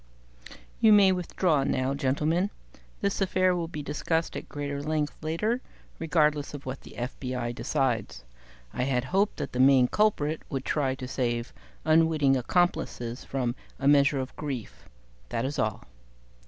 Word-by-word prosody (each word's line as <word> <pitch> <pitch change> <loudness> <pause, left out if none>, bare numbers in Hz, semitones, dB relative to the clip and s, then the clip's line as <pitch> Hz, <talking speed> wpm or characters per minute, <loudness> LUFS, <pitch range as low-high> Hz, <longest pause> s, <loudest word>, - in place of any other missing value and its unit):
"You 220 -2 +6
may 200 -2 +7
withdraw 175 -4 +1
now, 130 0 0
gentlemen; 150 +7 +1 0.5
this 200 0 0
affair 185 -1 +2
will 170 -1 -2
be 155 -3 -6
discussed 160 +3 -1
at - - -6
greater 145 -1 -4
length 150 0 -1
later, 210 +11 -1 0.4
regardless 150 -3 +1
of 145 - -9
what 130 +1 -5
the - - -13
FBI 125 -1 -3
decides. 115 - -1 0.5
I 125 - -1
had 125 -2 +1
hoped 195 +9 +1
that - - -4
the 125 - -4
main 130 -1 +6
culprit 160 -5 +1
would 135 -2 -3
try 135 -3 0
to 130 -1 -7
save 120 -2 -2 0.3
unwitting 155 -3 +4
accomplices 125 -4 0
from 125 -3 -2 0.2
a 135 - -1
measure 140 0 +5
of 130 0 -5
grief. 135 -8 -6 0.4
That 115 - -1
is 140 +2 -3
all." 110 -2 -1
145 Hz, 150 wpm, -28 LUFS, 130-165 Hz, 0.5 s, may